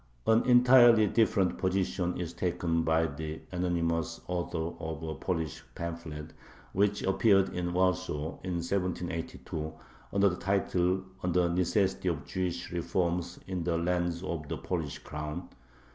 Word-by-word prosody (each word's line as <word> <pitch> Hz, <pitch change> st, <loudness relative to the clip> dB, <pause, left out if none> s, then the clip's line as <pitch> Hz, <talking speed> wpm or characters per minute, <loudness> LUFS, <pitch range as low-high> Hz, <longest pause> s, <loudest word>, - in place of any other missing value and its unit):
An 110 Hz, +1 st, +4 dB
entirely 125 Hz, -2 st, +7 dB
different 105 Hz, -3 st, +2 dB
position 95 Hz, -1 st, 0 dB
is 85 Hz, -1 st, -4 dB
taken 85 Hz, -2 st, 0 dB
by 80 Hz, 0 st, +2 dB
the 80 Hz, +1 st, -5 dB
anonymous 85 Hz, -2 st, -1 dB
author 85 Hz, -2 st, -2 dB
of 80 Hz, -1 st, -5 dB
a 80 Hz, -1 st, -3 dB
Polish 80 Hz, 0 st, -3 dB
pamphlet 85 Hz, -2 st, -6 dB, 0.4 s
which 100 Hz, +2 st, +2 dB
appeared 95 Hz, 0 st, +4 dB
in 90 Hz, -1 st, -2 dB
Warsaw 85 Hz, -4 st, 0 dB
in 90 Hz, -1 st, -3 dB
1782 85 Hz, -3 st, -3 dB, 0.4 s
under 100 Hz, 0 st, +4 dB
the 90 Hz, -2 st, 0 dB
title, 95 Hz, -1 st, +1 dB, 0.2 s
"On 90 Hz, -, 0 dB
the 90 Hz, 0 st, +3 dB
Necessity 95 Hz, +2 st, +1 dB
of 80 Hz, -3 st, -3 dB
Jewish 90 Hz, -2 st, -3 dB
Reforms 85 Hz, 0 st, -1 dB
in 90 Hz, -3 st, -3 dB
the 85 Hz, -1 st, 0 dB
Lands 85 Hz, 0 st, 0 dB
of 80 Hz, -5 st, -4 dB
the -, -, -2 dB
Polish 80 Hz, -6 st, -3 dB
Crown." 75 Hz, +3 st, -6 dB
90 Hz, 135 wpm, -30 LUFS, 85-95 Hz, 0.4 s, entirely